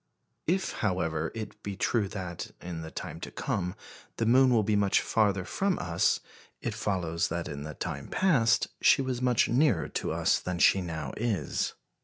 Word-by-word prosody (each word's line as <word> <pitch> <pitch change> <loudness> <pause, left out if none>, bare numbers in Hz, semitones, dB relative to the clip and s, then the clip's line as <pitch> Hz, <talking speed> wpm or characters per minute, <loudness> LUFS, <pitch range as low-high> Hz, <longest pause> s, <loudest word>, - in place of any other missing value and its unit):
If, 185 +3 +1
however, 85 -6 0
it 110 -2 -7
be 100 -1 -5
true 105 +2 +1
that, 95 -4 -5
in 85 -2 -6
the 80 - -6
time - - -6
to - - -6
come, 90 -1 -2 0.4
the 115 - 0
moon 130 +3 +6
will 115 -3 +4
be 105 +1 +1
much 100 -1 +3
farther 100 -4 +1
from 195 - 0
us, 85 -1 +1 0.4
it 120 - -3
follows 90 -6 -1
that 85 +1 -3
in 75 -3 -6
the 75 -2 -7
time - - -4
past 130 - +3
she 135 - +5
was 130 -2 -2
much 125 -2 +3
nearer 125 - +2
to - - -2
us - - +2
than 90 -1 -3
she 95 +2 +5
now 80 -5 -4
is. 110 -3 -1
100 Hz, 180 wpm, -29 LUFS, 85-115 Hz, 0.4 s, moon